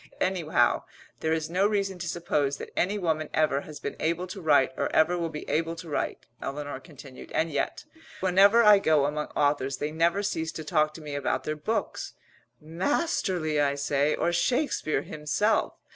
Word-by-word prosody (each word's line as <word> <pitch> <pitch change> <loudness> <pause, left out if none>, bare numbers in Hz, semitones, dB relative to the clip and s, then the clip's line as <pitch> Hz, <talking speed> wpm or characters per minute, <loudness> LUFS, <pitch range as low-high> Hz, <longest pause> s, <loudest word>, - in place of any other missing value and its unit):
"Anyhow, 180 -4 +1 0.3
there 160 - -1
is 160 -1 0
no 185 +4 +2
reason 195 -3 -1
to 175 - -4
suppose 145 -5 0
that - - -9
any 200 +4 +1
woman 160 -5 -1
ever 155 -3 +2
has 150 0 -10
been - - -5
able 170 +3 0
to 185 +1 -8
write 145 -5 +4
or - - -1
ever 160 +3 +4
will 170 -2 -2
be 150 -1 -7
able 165 +1 0
to 165 +1 -9
write," 150 - -3 0.2
Eleanor 145 -1 -5
continued. 135 -3 -13
"And 160 0 0
yet, 145 - -2 0.4
whenever 195 +5 +5
I 210 -2 +8
go 155 -6 +3
among 150 +1 -2
authors 145 -2 +1
they 150 +3 -3
never 170 +5 +1
cease 160 -5 -2
to 160 - -6
talk 155 0 +1
to 165 - -9
me 150 -1 -7
about 135 -2 -1
their 155 - -2
books. 215 +9 -3 0.5
Masterly! 175 - -1
I 140 -1 +2
say, 140 +1 +1
or 175 - 0
Shakespeare 175 - 0
himself! 155 +8 0
160 Hz, 180 wpm, -27 LUFS, 150-180 Hz, 0.5 s, I